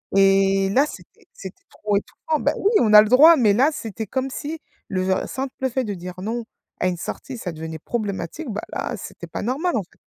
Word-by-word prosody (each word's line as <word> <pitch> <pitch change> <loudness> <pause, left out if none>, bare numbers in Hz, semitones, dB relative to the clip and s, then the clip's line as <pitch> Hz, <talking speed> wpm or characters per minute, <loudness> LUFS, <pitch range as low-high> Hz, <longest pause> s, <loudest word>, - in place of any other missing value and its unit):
Et 195 0 +4
là 275 +7 +4
c'était 425 +5 -13
c'était 190 0 -10
trop 210 -1 -2
étouffant. 310 +9 -3
Ben, - - +1
oui 410 - +2
on 215 -2 +3
a 210 - +11
le 215 - 0
droit, 310 +7 +8
mais 215 -5 +4
là 265 +7 +4
c'était 220 -3 -6
comme 265 +3 -2
si 310 +4 -5 0.3
le 185 -1 0
simple 265 0 -4 0.2
fait 260 +2 -1
de 210 -4 -3
dire 180 +1 -8
non 230 +3 -3 0.3
à 185 - +1
une 180 -1 -1
sortie 260 +8 -6
ça 185 -6 -5
devenait 160 0 -7
problématique, 210 - -4
ben, 215 -1 -3
là - - -3
c'était - - -9
pas - - -5
normal 290 - -1
en 210 - -1
fait. 175 - -26
215 Hz, 215 wpm, -22 LUFS, 195-265 Hz, 0.3 s, a